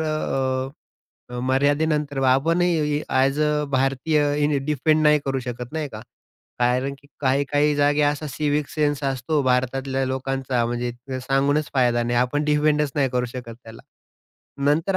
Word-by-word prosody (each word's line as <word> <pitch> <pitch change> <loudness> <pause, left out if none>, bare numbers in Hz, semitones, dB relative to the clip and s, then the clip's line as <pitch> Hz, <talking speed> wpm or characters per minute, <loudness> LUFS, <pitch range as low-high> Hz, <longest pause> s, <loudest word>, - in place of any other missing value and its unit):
अ, 135 -4 -4
अ, - - -4
मर्यादेनंतर 145 +2 +1
आपणही 155 +2 +2
as 135 +3 +2
a 150 0 +1
भारतीय 145 +2 +1
defend 155 +1 +2
नाही 150 0 +5
करू 135 -1 -1
शकत 125 +1 -6
नाही 155 -2 -3
का? 110 -3 -9 0.6
कारण 125 +3 +1
की 140 - -22
काही-काही 145 +2 +2
जागी 145 +1 +2
असा 145 +1 0
सिव्हिक 150 0 -1
सेन्स 145 -2 -1
असतो 135 +3 0
भारतातल्या 130 +1 0
लोकांचा 130 -2 -1
म्हणजे 120 0 -2 0.2
अ, 130 - -2
सांगूनच 140 +3 0
फायदा 120 -2 +2
नाही 120 0 -1
आणि 120 - +4
आपण 145 +4 -1
त्याला 150 0 +2
डिफेंडच 150 -2 +2
नाही 140 -2 +2
करू 125 0 0
शकत 120 -1 -8
त्याला. 110 0 -12 0.8
नंतर 160 +7 +2
140 Hz, 150 wpm, -23 LUFS, 130-150 Hz, 0.8 s, नाही